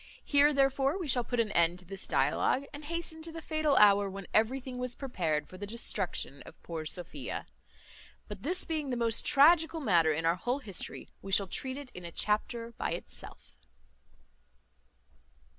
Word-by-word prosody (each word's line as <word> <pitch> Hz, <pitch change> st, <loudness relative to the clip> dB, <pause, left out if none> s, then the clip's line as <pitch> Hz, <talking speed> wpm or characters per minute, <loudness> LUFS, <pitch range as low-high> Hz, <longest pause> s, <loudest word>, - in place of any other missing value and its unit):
Here, 290 Hz, 0 st, +5 dB
therefore, 275 Hz, +2 st, +2 dB
we 360 Hz, -5 st, -4 dB
shall 250 Hz, -3 st, +2 dB
put 245 Hz, +1 st, -2 dB
an 220 Hz, -2 st, +1 dB
end 170 Hz, -1 st, +3 dB
to 180 Hz, -, -14 dB
this 195 Hz, +2 st, -6 dB
dialogue, 270 Hz, +2 st, +1 dB
and 290 Hz, +1 st, -8 dB
hasten 330 Hz, 0 st, -5 dB
to 330 Hz, +1 st, -5 dB
the 330 Hz, -, -7 dB
fatal 310 Hz, -2 st, 0 dB
hour 205 Hz, -2 st, +6 dB
when 195 Hz, 0 st, -7 dB
everything 250 Hz, +3 st, +1 dB
was 250 Hz, -1 st, -3 dB
prepared 165 Hz, -, -2 dB
for 185 Hz, -, -12 dB
the 205 Hz, -, -5 dB
destruction 195 Hz, -10 st, -2 dB
of -, -, -13 dB
poor 160 Hz, -2 st, -5 dB
Sophia. 155 Hz, -6 st, -4 dB, 0.8 s
But 205 Hz, -2 st, -8 dB
this 360 Hz, +8 st, -1 dB
being 310 Hz, -4 st, -2 dB
the 250 Hz, -, -1 dB
most 230 Hz, -1 st, +2 dB
tragical 320 Hz, +3 st, +5 dB
matter 170 Hz, -, +4 dB
in 160 Hz, +2 st, -1 dB
our 165 Hz, +2 st, +3 dB
whole 245 Hz, +7 st, -1 dB
history, 210 Hz, -10 st, -5 dB
we 195 Hz, -, -8 dB
shall 195 Hz, +1 st, +3 dB
treat 260 Hz, +8 st, -3 dB
it 285 Hz, -3 st, -9 dB
in 180 Hz, -, -9 dB
a 170 Hz, -, -7 dB
chapter 230 Hz, +5 st, 0 dB
by -, -, -1 dB
itself. -, -, -8 dB
235 Hz, 175 wpm, -31 LUFS, 190-285 Hz, 0.8 s, hour